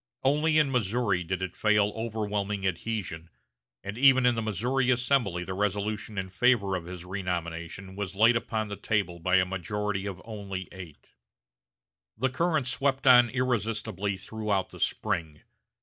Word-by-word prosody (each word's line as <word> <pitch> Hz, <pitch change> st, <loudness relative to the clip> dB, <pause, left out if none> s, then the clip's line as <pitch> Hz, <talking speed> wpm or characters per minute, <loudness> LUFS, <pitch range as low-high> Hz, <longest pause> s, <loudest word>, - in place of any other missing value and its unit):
Only 150 Hz, +4 st, +3 dB
in 150 Hz, -3 st, +3 dB
Missouri 110 Hz, -5 st, +1 dB
did 95 Hz, +2 st, -3 dB
it 95 Hz, -, -4 dB
fail 105 Hz, -1 st, +3 dB
of -, -, -11 dB
overwhelming 105 Hz, -3 st, -2 dB
adhesion, 90 Hz, -3 st, -3 dB, 0.5 s
and 100 Hz, +4 st, -6 dB
even 130 Hz, -1 st, +6 dB
in 125 Hz, -, +5 dB
the 115 Hz, -, -2 dB
Missouri 120 Hz, +5 st, 0 dB
Assembly 120 Hz, -8 st, +1 dB
the 95 Hz, -, -5 dB
resolution 105 Hz, +1 st, -2 dB
in 95 Hz, -1 st, -3 dB
favor 100 Hz, -2 st, +3 dB
of 90 Hz, -2 st, -4 dB
his 90 Hz, 0 st, -8 dB
renomination 90 Hz, 0 st, -4 dB
was 100 Hz, -2 st, -4 dB
laid 115 Hz, +4 st, +5 dB
upon 110 Hz, -2 st, -1 dB
the 100 Hz, -, -4 dB
table 100 Hz, -5 st, -1 dB
by 90 Hz, +2 st, +2 dB
a 95 Hz, -1 st, +5 dB
majority 95 Hz, +2 st, -3 dB
of 95 Hz, -2 st, -5 dB
only 100 Hz, -4 st, -6 dB
eight. 90 Hz, -6 st, -12 dB, 1.1 s
The 130 Hz, +3 st, 0 dB
current 160 Hz, -1 st, +1 dB
swept 135 Hz, +1 st, 0 dB
on 125 Hz, -2 st, +8 dB
irresistibly 110 Hz, -5 st, -1 dB
throughout 105 Hz, -1 st, -2 dB
the -, -, -12 dB
spring. 80 Hz, -3 st, -2 dB
105 Hz, 155 wpm, -28 LUFS, 95-120 Hz, 1.1 s, on